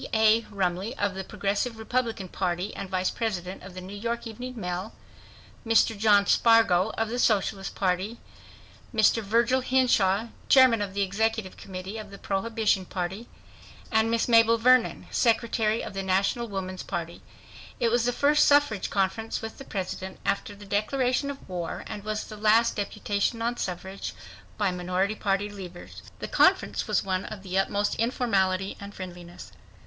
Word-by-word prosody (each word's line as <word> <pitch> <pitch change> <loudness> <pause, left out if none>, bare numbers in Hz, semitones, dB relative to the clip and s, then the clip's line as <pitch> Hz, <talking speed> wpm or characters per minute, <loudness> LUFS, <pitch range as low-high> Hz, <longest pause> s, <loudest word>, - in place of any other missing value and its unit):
A. 220 0 +5
Rumley 195 +3 -2
of 205 -1 0
the 190 0 -5
Progressive 205 +4 -2
Republican 225 -3 -2
Party 180 +2 -2
and 195 - -6
Vice 185 0 0
President 190 -5 -3
of 185 -1 -11
the 185 - -6
New 190 +2 -8
York 235 +3 -3
Evening 245 +2 -7
Mail; 180 +3 -4 0.7
Mr. 225 0 +3
John 205 -1 +4
Spargo 220 -4 +4
of 225 0 0
the 245 +2 -3
Socialist 200 -3 +1
Party; 190 +4 -1 0.7
Mr. 225 0 +3
Virgil 235 +5 +2
Hinshaw, 235 -5 +2 0.2
chairman 255 -5 +6
of 195 -1 -4
the 200 - +2
Executive 215 0 -1
Committee 190 +3 -7
of 210 -1 -8
the 200 - -10
Prohibition 205 0 0
Party; 190 +5 -4 0.6
and 220 0 +3
Miss 230 0 +1
Mabel 230 -1 +5
Vernon, 250 +1 +3
Secretary 225 -1 +1
of - - -6
the 195 - -3
National 195 +5 0
Woman's 190 -2 -5
Party. 170 -2 -5 0.6
It 235 - +2
was 240 0 +2
the 245 - +2
first 290 +4 +3
suffrage 285 -9 +3
conference 200 +3 -1
with 225 - -7
the 275 - -9
President 190 -2 -5
after 205 +1 -1
the 205 0 -12
declaration 250 +7 0
of 280 -1 -8
war, 175 -3 -4
and 205 - -7
was 215 0 -2
the 215 - -10
last 220 +2 +4
deputation 205 +2 -1
on 235 +1 -1
suffrage 190 +2 -5 0.4
by 205 -3 +1
minority 180 +3 -1
party 200 -1 0
leaders. 185 -4 -10 0.2
The - - -5
conference - - +2
was - - +1
one 185 -1 -2
of 205 -3 -8
the 185 -1 -5
utmost 205 +1 0
informality 195 -6 0
and 200 0 -9
friendliness. 175 -1 -9
205 Hz, 160 wpm, -27 LUFS, 190-230 Hz, 0.7 s, chairman